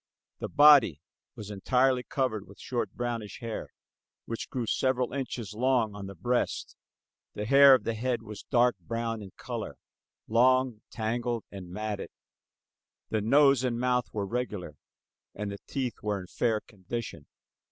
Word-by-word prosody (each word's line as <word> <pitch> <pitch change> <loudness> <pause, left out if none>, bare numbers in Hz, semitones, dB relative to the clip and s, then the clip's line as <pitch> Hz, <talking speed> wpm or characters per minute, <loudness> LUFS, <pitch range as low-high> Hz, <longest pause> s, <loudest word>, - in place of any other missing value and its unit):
The - - -4
body 145 - +7 0.4
was 105 -1 -8
entirely 125 +5 +2
covered 125 -6 -2
with 100 - -15
short 120 -2 -3
brownish 120 -4 -4
hair 115 -3 -5 0.6
which 115 - -5
grew 125 -3 -2
several 130 +2 0
inches 125 -6 -4
long 120 -2 +2
on 100 -1 -7
the 100 - -9
breast. 120 +8 -1 0.6
The 105 - -3
hair 140 +3 +8
of - - -2
the 115 - -1
head 120 +1 -1
was 105 -1 -8
dark 120 -3 +3
brown 115 +4 -3
in 100 - -8
color, - - -5 0.5
long, 125 0 +3
tangled 115 +1 -2
and 95 -3 -8
matted. 105 +2 -4 1.0
The 110 - +1
nose 135 +3 +5
and 120 -2 0
mouth 125 -1 +1
were 105 -2 -2
regular, 105 -8 -4 0.6
and 105 0 -4
the 100 - -7
teeth 130 -4 -2
were 105 -1 -1
in 90 - -8
fair 110 +3 0
condition. 100 -5 -7
115 Hz, 150 wpm, -29 LUFS, 105-125 Hz, 1.0 s, hair